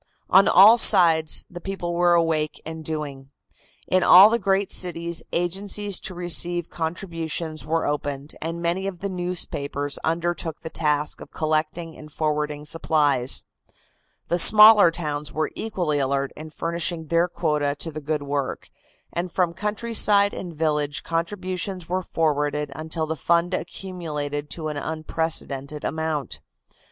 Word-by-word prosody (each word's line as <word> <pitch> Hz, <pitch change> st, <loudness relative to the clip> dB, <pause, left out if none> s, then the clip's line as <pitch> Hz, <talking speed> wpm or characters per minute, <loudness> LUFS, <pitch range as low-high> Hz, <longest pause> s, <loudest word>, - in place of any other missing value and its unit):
On 195 Hz, +1 st, +7 dB
all 210 Hz, +6 st, +8 dB
sides 165 Hz, -6 st, +5 dB
the 175 Hz, 0 st, -10 dB
people 185 Hz, -2 st, -4 dB
were 175 Hz, 0 st, +3 dB
awake 160 Hz, -2 st, 0 dB
and 160 Hz, 0 st, -7 dB
doing. 145 Hz, -4 st, -5 dB, 0.6 s
In 185 Hz, -, +2 dB
all 195 Hz, +5 st, +8 dB
the 235 Hz, -, +1 dB
great 195 Hz, 0 st, 0 dB
cities 170 Hz, -2 st, -2 dB
agencies 195 Hz, +3 st, -1 dB
to 185 Hz, -, -7 dB
receive 175 Hz, 0 st, -1 dB
contributions 165 Hz, -2 st, -4 dB
were 165 Hz, +1 st, 0 dB
opened, 145 Hz, 0 st, -3 dB
and 165 Hz, +1 st, -4 dB
many 180 Hz, +3 st, -1 dB
of 185 Hz, -3 st, -6 dB
the 200 Hz, -, -2 dB
newspapers 155 Hz, -6 st, -3 dB
undertook 165 Hz, -1 st, -2 dB
the 160 Hz, -, -7 dB
task 150 Hz, -1 st, -1 dB
of -, -, -10 dB
collecting 155 Hz, +1 st, -2 dB
and 150 Hz, 0 st, -12 dB
forwarding 150 Hz, -1 st, -2 dB
supplies. 150 Hz, -5 st, +1 dB, 0.8 s
The 175 Hz, -, +1 dB
smaller 210 Hz, 0 st, +8 dB
towns 150 Hz, -3 st, -4 dB
were 155 Hz, 0 st, -2 dB
equally 175 Hz, -9 st, -2 dB
alert 140 Hz, 0 st, -1 dB
in 155 Hz, +1 st, -9 dB
furnishing 170 Hz, +1 st, -3 dB
their 170 Hz, +3 st, +2 dB
quota 150 Hz, -4 st, -1 dB
to 160 Hz, +3 st, -5 dB
the 155 Hz, 0 st, -7 dB
good 150 Hz, 0 st, -2 dB
work, 140 Hz, -1 st, -4 dB, 0.4 s
and 175 Hz, +1 st, -3 dB
from 175 Hz, -2 st, 0 dB
countryside 210 Hz, -1 st, +1 dB
and 180 Hz, -, -6 dB
village 150 Hz, -2 st, -1 dB
contributions 180 Hz, +1 st, -3 dB
were 185 Hz, +1 st, -1 dB
forwarded 150 Hz, -3 st, -1 dB
until 160 Hz, +1 st, -3 dB
the 160 Hz, +1 st, -3 dB
fund 170 Hz, +3 st, +1 dB
accumulated 160 Hz, -5 st, -4 dB
to 155 Hz, -2 st, -4 dB
an 150 Hz, -, -5 dB
unprecedented 155 Hz, -2 st, -3 dB
amount. 155 Hz, -, -2 dB
165 Hz, 140 wpm, -23 LUFS, 150-175 Hz, 0.8 s, all